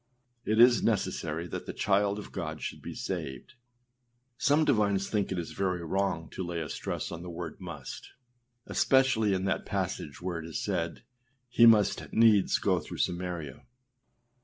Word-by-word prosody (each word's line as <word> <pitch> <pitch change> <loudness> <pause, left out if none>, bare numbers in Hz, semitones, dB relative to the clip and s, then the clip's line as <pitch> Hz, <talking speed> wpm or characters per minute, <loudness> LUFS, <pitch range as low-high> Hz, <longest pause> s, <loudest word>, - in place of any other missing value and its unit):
It 110 +1 +1
is 120 0 +7
necessary 80 +3 -1
that - - -6
the - - -4
child 100 0 +1
of 105 - -8
God 80 -4 -4
should - - -5
be - - -7
saved. 65 -2 -5 0.8
Some 150 +4 +3
divines 100 -7 +2
think 105 -3 -1
it 95 - -1
is 85 -2 -4
very 90 -3 -1
wrong 95 -2 -1
to 95 - -4
lay 85 -1 -3
a 75 -2 -4
stress - - -4
on 85 - -6
the 90 - -7
word 85 -2 -6
âmust,â 80 -8 -8 0.6
especially 130 -7 +3
in 95 0 -2
that 95 - 0
passage 70 - -3
where 90 -1 -3
it 80 - -7
is 80 - -4
said 85 -5 -2 0.5
âhe 115 0 +9
must 105 -3 +2
needs 110 -3 +5
go - - +1
through - - -8
Samaria. 85 -6 -3
95 Hz, 165 wpm, -29 LUFS, 85-105 Hz, 0.8 s, âhe